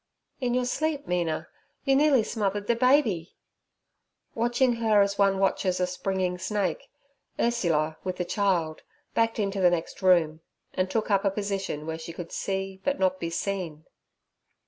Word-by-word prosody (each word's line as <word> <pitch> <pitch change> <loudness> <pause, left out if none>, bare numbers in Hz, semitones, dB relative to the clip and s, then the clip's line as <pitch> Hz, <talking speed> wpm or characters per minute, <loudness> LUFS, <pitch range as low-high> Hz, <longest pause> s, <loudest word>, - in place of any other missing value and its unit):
'In 250 -2 0
your 250 0 +1
sleep, 300 +3 -1
Mina, 170 -3 -1 0.4
you 270 -1 +3
nearly 280 -4 +4
smothered 205 -2 -2
the 235 - +2
baby.' 235 - +2 1.0
Watching 240 +1 +2
her 220 -2 +3
as 200 0 -2
one 195 -1 +4
watches 190 -1 +1
a 180 - +2
springing 180 0 -2
snake, 195 -4 -2 0.5
Ursula, 165 -10 +1
with 185 -1 -3
the 180 - -1
child, 175 -6 0 0.3
backed 225 0 +1
into 200 -2 -1
the 180 - +6
next 175 +2 -3
room, 165 -4 +3 0.3
and 185 0 0
took 220 +2 -1
up 195 0 +3
a 200 - +3
position 195 -6 -3
where 160 0 -4
she 165 +1 -7
could 170 0 -8
see 195 -1 -3
but 280 - 0
not 185 -1 +1
be 170 - -3
seen. 170 -3 -3
195 Hz, 160 wpm, -27 LUFS, 180-225 Hz, 1.0 s, the